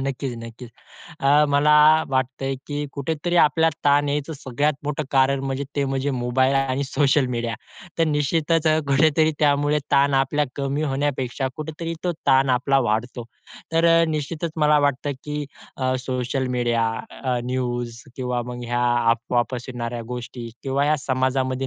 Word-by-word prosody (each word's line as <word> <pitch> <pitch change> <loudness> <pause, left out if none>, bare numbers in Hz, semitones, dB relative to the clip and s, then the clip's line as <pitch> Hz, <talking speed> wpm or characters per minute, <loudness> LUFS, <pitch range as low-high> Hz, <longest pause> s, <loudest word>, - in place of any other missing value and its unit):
नक्कीच, 135 -2 -3
नक्कीच. 115 +1 -10 0.5
अ, 145 +2 +5
मला 150 +1 +4 0.4
वाटतंय 130 +1 -1
की 145 0 -3
कुठेतरी 160 +4 -2
आपल्याला 160 0 +3
ताण 145 0 +4
यायचं 145 +2 -2
सगळ्यात 140 +4 0
मोठं 150 +1 -2
कारण 135 0 +3
म्हणजे 135 +1 -2
ते 140 - +1
म्हणजे 135 +1 -1
मोबाईल 130 +1 +1
आणि 135 0 0
सोशल 140 0 +2
मीडिया. 115 -1 -2 0.4
तर 165 - +4
निश्चितच 155 +2 +1
अ, 155 0 +4
कुठेतरी 155 +3 +3
त्यामुळे 145 0 +2
ताण 140 0 +3
आपला 135 +2 +2
कमी 140 +1 -1
होण्यापेक्षा, 135 -2 -1
कुठेतरी 160 +2 -5
तो 175 - +1
ताण 135 -1 +4
आपला 130 +2 +2
वाढतो. 115 +3 -2 0.5
तर 165 +1 +2 0.2
अ, - - +4
निश्चितच 155 +2 -3
मला 150 -1 +4
वाटतं, 145 0 0
की 150 0 -3 0.3
अ, 130 -1 0
सोशल 130 +1 -2
मीडिया, 120 -1 +1 0.4
अ, 125 -2 0
न्यूज, 120 -2 -3
किंवा 125 -2 -2
मग 125 0 -6
ह्या 120 +1 -1 0.3
अफवा 120 +1 +1
पसरवणाऱ्या 120 -2 -5
गोष्टी 120 -1 -6
किंवा 135 +1 0
ह्या 155 +1 +2
समाजामध्ये 130 0 0
135 Hz, 150 wpm, -23 LUFS, 125-150 Hz, 0.5 s, अ